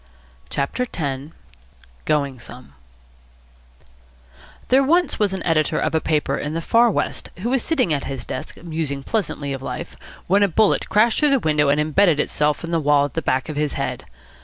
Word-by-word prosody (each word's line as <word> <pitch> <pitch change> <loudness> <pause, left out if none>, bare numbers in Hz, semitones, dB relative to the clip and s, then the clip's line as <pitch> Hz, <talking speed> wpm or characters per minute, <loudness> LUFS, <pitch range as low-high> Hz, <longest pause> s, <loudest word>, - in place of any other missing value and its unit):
CHAPTER 145 - -2
X 140 -1 -4 0.7
GOING 140 -4 0
SOME 125 - -12 2.0
There 260 +2 +5
was 330 +4 +2
once 205 -2 +2
an 190 -1 -4
editor 155 -3 +1
of - - 0
a 160 - +2
paper 150 -3 0
in 150 +2 -4
the - - 0
Far 235 +5 +4
West - - -2
who 240 - -1
was 265 -2 +2
sitting 255 - +1
at 140 - -2
his 135 -2 -5
desk, 130 - -6
musing 155 -5 -3
pleasantly 150 -10 -2
of 135 - -6
life, - - -6 0.3
when 195 +3 +3
a 200 - +5
bullet 205 +4 +2
crashed 220 +3 +3
through 300 - +4
the 275 - +4
window 150 -6 +2
and 145 +1 +3
embedded 155 +1 +3
itself 150 +2 0
in 165 - -5
the 165 - +2
wall 145 -1 +3
at 145 - -7
the - - -2
back 130 0 0
of 155 - -5
his 150 -1 0
head. - - -4
155 Hz, 185 wpm, -21 LUFS, 145-205 Hz, 2.0 s, There